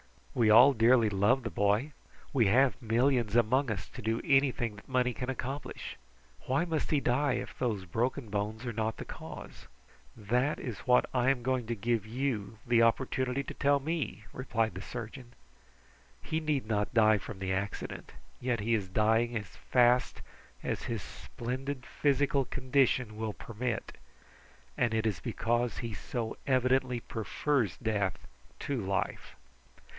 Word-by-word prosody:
"We 115 -3 +3
all 125 +6 +8
dearly 115 -1 +5
love 105 +7 +2
the 115 - -4
boy. 105 +8 +1 0.4
We 120 -7 +4
have 130 +6 +3
millions 120 -1 +2
among 125 +4 +3
us 105 -5 -3
to - - -9
do 115 +2 0
anything 135 -5 +2
that 100 - -14
money 125 -1 +2
can 125 +4 -4
accomplish. 130 +2 -5 0.5
Why 135 +6 +2
must 160 -3 -2
he 150 - +3
die, 135 +2 +2
if 125 - -5
those 110 -6 -1
broken 120 +6 -1
bones 105 +3 -3
are 120 - -3
not 110 0 -1
the - - -6
cause?" - - -9 0.5
"That 125 +8 0
is 115 -7 -5
what 125 -1 +4
I 125 0 +3
am 130 -3 +1
going 130 -2 0
to 120 - -1
give 115 0 -1
you 115 -4 -2
the 120 -1 +4
opportunity 130 +3 +1
to - - -7
tell 140 0 +3
me," 155 -8 -3
replied 115 -5 -1
the 95 - -6
surgeon. 120 +3 -8 0.9
"He 160 - -1
need 150 -5 -1
not 105 0 -1
die 110 -2 +6
from 105 +1 -8
the 95 0 -2
accident, 100 +2 -4 0.3
yet 120 -3 -1
he 115 +3 +1
is 105 -4 0
dying 115 +4 +2
as 100 -6 -8
fast 125 0 +3 0.4
as - - -2
his 115 -5 -3
splendid 130 +2 -5
physical 140 -1 +1
condition 130 -4 +1
will 110 -1 -3
permit, 120 +2 -4 0.8
and 120 -2 +1
it 110 0 0
is 105 -7 0
because 120 +7 -1
he 115 -2 -4
so 115 +2 -4
evidently 130 -1 +2
prefers 115 - -1
death 105 -5 -1 0.4
to 140 -4 -2
life. 95 0 -2
120 Hz, 155 wpm, -31 LUFS, 110-130 Hz, 0.9 s, all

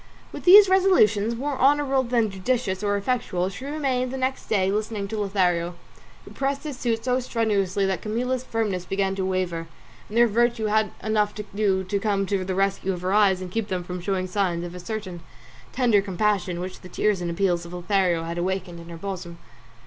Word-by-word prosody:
With - - -9
these 395 +3 +10
resolutions, 235 - +3
more 275 +2 -3
honourable 275 0 +3
than 235 -4 0
judicious 195 0 -1
or 205 -1 +1
effectual, 200 -5 -1
she 225 +7 -9
remained 270 -4 -1
the 265 - -4
next 260 +1 -2
day 195 -3 +2
listening 210 -1 -2
to 220 0 -3
Lothario, 180 -4 0 0.5
who - - -12
pressed 275 +1 -2
his 300 -3 -5
suit 230 -2 -1
so 250 0 +2
strenuously 205 -6 0
that 190 -1 -1
Camilla's 250 +4 -2
firmness 215 -7 -2
began 195 +1 -1
to 195 -1 -2
waver, 185 -3 -2 0.4
and 215 - -4
her 240 - +7
virtue 235 0 +1
had 215 0 +1
enough 210 -1 +1
to 210 - -5
do 200 -2 +1
to 200 +2 -2
come 200 -1 0
to 195 -1 -1
the 185 0 -3
rescue 195 0 0
of 175 - -6
her 185 +2 -1
eyes 200 -3 +4
and 180 -1 -6
keep 225 +1 -2
them 185 -3 -2
from 180 0 -6
showing 185 0 -1
signs 180 -2 -1
of 175 - -7
a 180 - -8
certain 190 -3 -6 0.5
tender 235 -6 +3
compassion 195 -2 0
which 185 +1 -7
the 185 - -11
tears 205 -2 0
and 175 - -2
appeals 175 0 0
of 170 - -10
Lothario 180 -1 +1
had 170 +1 -4
awakened 180 -1 -3
in 170 0 -11
her 170 - -8
bosom. 180 -2 -6
200 Hz, 200 wpm, -24 LUFS, 185-230 Hz, 0.5 s, these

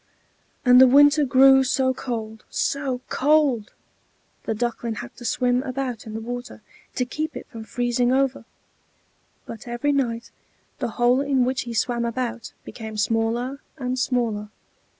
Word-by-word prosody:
And 250 0 +8
the 260 - +9
winter 290 +3 +6
grew 265 +1 +6
so 260 0 +1
cold, 220 -4 -5
so 270 -3 -1
cold! 280 -6 +2 0.7
The 220 - -1
Duckling 235 0 -2
had 120 - -8
to 240 - -10
swim 250 +1 +1
about 255 -3 -4
in 215 - -7
the - - -3
water, 245 +2 -7 0.3
to 250 - 0
keep 310 +5 -4
it - - -8
from 225 -2 -8
freezing 245 +2 0
over; 270 -2 0 1.0
but 230 +1 -9
every 240 +5 -1
night 240 -4 -1 0.5
the - - -1
hole 245 +2 +3
in 275 -3 +2
which 255 0 -1
he 230 - -5
swam 235 +1 0
about 235 0 -3
became 220 -2 -8
smaller 225 +5 -1 0.2
and 255 -2 -3
smaller. 230 -5 -1
245 Hz, 150 wpm, -23 LUFS, 230-265 Hz, 1.0 s, the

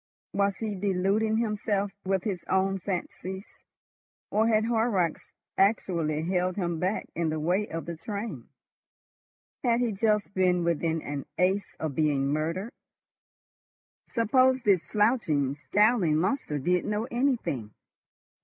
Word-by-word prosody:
Was 200 -1 +1
he 220 -2 -3
deluding 200 +3 +1
himself 210 -3 0
with 190 -1 0
his 190 -5 -3
own 190 +1 +2
fancies, 190 +1 -4 0.9
or 220 +2 +3
had 220 -1 +3
Horrocks 220 -7 +1 0.4
actually 170 -6 +1
held 180 +1 0
him 175 -4 -2
back 185 +5 -1
in 170 -1 -1
the 155 0 -2
way 180 +7 +1
of 165 0 -5
the 170 -1 -5
train? 210 +5 -6 1.1
Had 235 -2 +3
he 245 -2 +1
just 210 0 +1
been 180 -2 +2
within 165 -1 0
an 145 -1 -5
ace 190 +3 +1
of 155 -3 -2
being 140 -2 +1
murdered? 165 +8 -2 1.4
Suppose 255 +3 +3
this 195 -5 +4
slouching, 205 - +2
scowling 205 +2 +2
monster 180 - 0
did 180 +6 +1
know 210 +1 -1
anything? 235 - 0
190 Hz, 125 wpm, -28 LUFS, 165-215 Hz, 1.4 s, this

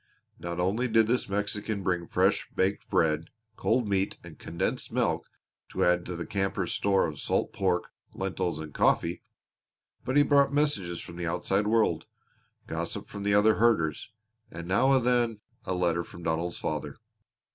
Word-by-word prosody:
Not 85 0 -4
only 100 +8 +1
did 115 -1 +4
this 120 0 0
Mexican 105 0 -2
bring 90 -2 -1
fresh - - +1
baked 95 +2 0
bread, 80 0 +2 0.3
cold 115 +1 +1
meat, 100 -1 0
and - - -12
condensed 85 +1 -3
milk - - 0 0.4
to - - -1
add 90 0 +2
to 90 - -4
the 85 - -4
campers' 95 -1 -1
stock 100 -1 +2
of 75 -3 -7
salt - - -1
pork, 90 -2 0 0.2
lentils, 95 -3 -2
and 80 -2 -7
coffee, 85 +1 +2 0.8
but 130 +3 0
he 145 - +7
brought 140 -1 +4
messages 125 - 0
from 85 - -10
the 85 -1 -3
outside 95 +4 0
world; 110 0 +2 0.6
gossip - - -4
from 100 - -7
the 100 0 +2
other 105 +1 +5
herders; 105 -10 +2 0.4
and 85 +1 -8
now 105 +9 +3
and 130 -3 +3
then 120 -3 +2 0.3
a 95 - -1
letter 85 -1 +1
from 85 - -12
Donald's 85 +2 -1
father. - - -3
95 Hz, 165 wpm, -28 LUFS, 85-110 Hz, 0.8 s, he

